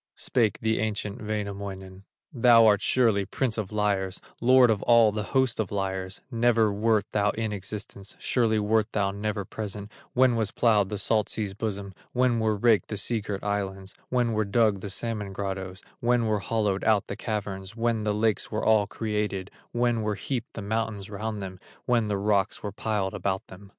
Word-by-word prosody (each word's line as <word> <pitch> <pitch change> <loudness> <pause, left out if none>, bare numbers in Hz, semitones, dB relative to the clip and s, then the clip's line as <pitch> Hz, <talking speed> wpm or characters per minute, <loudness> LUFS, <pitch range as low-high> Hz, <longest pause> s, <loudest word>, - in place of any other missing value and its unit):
Spake 115 -5 +1
the 110 0 +1
ancient 105 0 -2
Wainamoinen: 100 -2 -5 0.3
"Thou 120 -2 +6
art 105 -1 +5
surely 115 -5 +3
prince 115 +4 -1
of 105 -2 -4
liars, 100 -3 0 0.2
Lord 125 0 +6
of 105 -2 0
all 115 -2 +5
the 105 +1 -3 0.2
host 130 -4 +2
of 105 -4 -1
liars; 95 -2 -3
Never 115 -3 +3
wert 110 0 +2
thou 105 -1 +2
in 110 0 -2
existence, 100 0 -6
Surely 115 -3 +1
wert 110 +1 +1
thou 100 -2 +1
never 100 0 -3
present, 105 -1 -6 0.2
When 125 -1 +4
was 110 -3 0
plowed 105 -4 +2
the 105 - -3
salt 110 +1 +2
sea's 105 -3 -1
bosom, 100 -2 -4 0.2
When 125 -2 +2
were 110 -1 +1
raked 110 0 +3
the 105 - -4
sea 110 +3 0
girt 100 -1 -5
islands, 100 -1 -3 0.2
When 120 -2 +1
were 110 0 +1
dug 105 0 +2
the 100 - -6
salmon 105 -1 -2
grottoes, 95 -1 -5 0.2
When 120 -1 +2
were 110 -1 +1
hollowed 105 -2 -1
out 110 -3 +3
the - - -5
caverns, 100 -2 -4
When 115 -1 0
the 105 - +1
lakes 110 0 0
were 110 - -2
all 110 -2 +4
created, 105 -3 -3 0.2
When 120 -1 +1
were 105 -1 -1
heaped 120 +4 -4
the 105 - -6
mountains 105 -1 -3
round 105 0 -4
them, 95 -1 -7 0.3
When 120 -3 +2
the 105 -1 0
rocks 100 0 0
were 105 - -3
piled 105 -2 -2
about 95 -1 -2
them. 95 +2 -12
105 Hz, 185 wpm, -27 LUFS, 100-115 Hz, 0.3 s, Thou